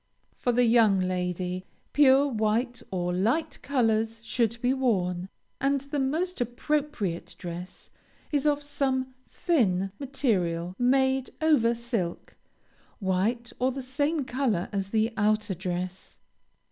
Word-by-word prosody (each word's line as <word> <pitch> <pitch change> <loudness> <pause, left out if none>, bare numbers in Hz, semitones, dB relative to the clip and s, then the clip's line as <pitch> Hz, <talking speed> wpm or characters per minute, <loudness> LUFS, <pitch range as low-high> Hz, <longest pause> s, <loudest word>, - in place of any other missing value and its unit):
For 245 - 0
the 245 +1 +3
young 225 -4 +5
lady, 180 0 -2 0.3
pure 280 -1 +6
white 230 0 0
or 180 -1 -1
light 225 - 0
colors 225 -4 +1
should 230 -1 0
be 250 +2 +2
worn, 185 -9 0 0.3
and 275 0 +1
the 280 +1 -3
most 320 +5 -1
appropriate 245 - -2
dress 175 +1 -8 0.4
is 290 -1 +1
of 290 0 +2
some 260 -2 -1 0.2
thin 195 - +1
material 190 -11 0
made 265 +1 +2
over 265 -7 +3
silk, 230 -7 -3 0.6
white, 215 +5 -1
or 255 +1 +2
the 265 +1 -5
same 285 +3 0
color 245 -9 0
as 195 -1 -2
the 220 +2 +1
outer 215 -1 +2
dress. 180 +1 -5
235 Hz, 120 wpm, -27 LUFS, 190-265 Hz, 0.6 s, pure